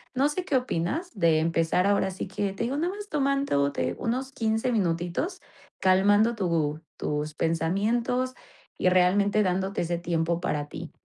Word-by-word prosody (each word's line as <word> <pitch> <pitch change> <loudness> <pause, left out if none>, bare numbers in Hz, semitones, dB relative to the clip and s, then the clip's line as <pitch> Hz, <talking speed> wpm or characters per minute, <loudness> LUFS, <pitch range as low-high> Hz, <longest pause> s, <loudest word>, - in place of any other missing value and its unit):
No 275 +3 +3
sé 360 +4 -3
qué 295 - 0
opinas 255 - -1
de 165 -4 +4
empezar 165 +3 +1
ahora 200 -1 +2
sí 185 - -5
que 195 +1 -2
te 195 - -3
digo 260 +4 -1
no 335 +4 0
más 410 +2 -7
tomándote 275 - 0
unos 260 +3 -2
15 225 +1 0
minutitos 175 - -1 0.4
calmando 205 +5 +4
tu 165 -6 0 0.2
tus 150 +1 -2
pensamientos 215 +11 0 0.4
y - - +1
realmente 200 +3 +3
dándote 190 +1 -1
ese 170 0 -1
tiempo 170 0 -1
para 145 -4 -2
ti. - - -8
195 Hz, 150 wpm, -27 LUFS, 170-250 Hz, 0.4 s, de